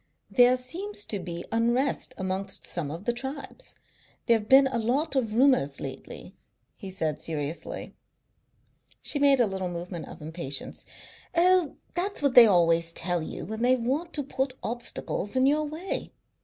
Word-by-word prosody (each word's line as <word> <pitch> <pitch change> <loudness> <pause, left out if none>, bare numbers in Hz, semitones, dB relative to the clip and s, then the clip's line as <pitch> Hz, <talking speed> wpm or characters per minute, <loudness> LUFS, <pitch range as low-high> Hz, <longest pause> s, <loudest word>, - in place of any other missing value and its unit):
"There 250 0 +5
seems 375 +12 -4
to 205 - -3
be 175 -1 -6
unrest 240 +3 0
amongst 190 +1 -3
some 165 -5 -2
of 165 +7 -7
the 240 - +1
tribes. 270 - -7 0.5
There 230 -2 +4
have 210 - -11
been 270 +1 +8
a 260 -3 -1
lot 275 +7 0
of 225 -5 0
rumours 240 - +3
lately," 135 -1 -8 0.4
he 195 - -8
said 155 -5 -2
seriously. 155 0 -4 1.1
She 290 - 0
made 280 -2 +5
a 240 - +5
little 190 -3 -3
movement 175 0 -6
of - - -11
impatience. 155 -3 -4 0.5
"Oh, 355 -2 +4 0.2
that's 360 -1 -1
what 280 -3 +3
they 240 -2 +10
always 170 -3 +3
tell 175 +1 0
you 155 - -6
when 220 +2 -5
they 250 +1 +4
want 270 +8 -2
to 290 - -1
put 265 -1 -3
obstacles 235 -2 -4
in 260 0 +4
your 300 +2 +3
way. 320 +6 -4
235 Hz, 160 wpm, -27 LUFS, 175-275 Hz, 1.1 s, they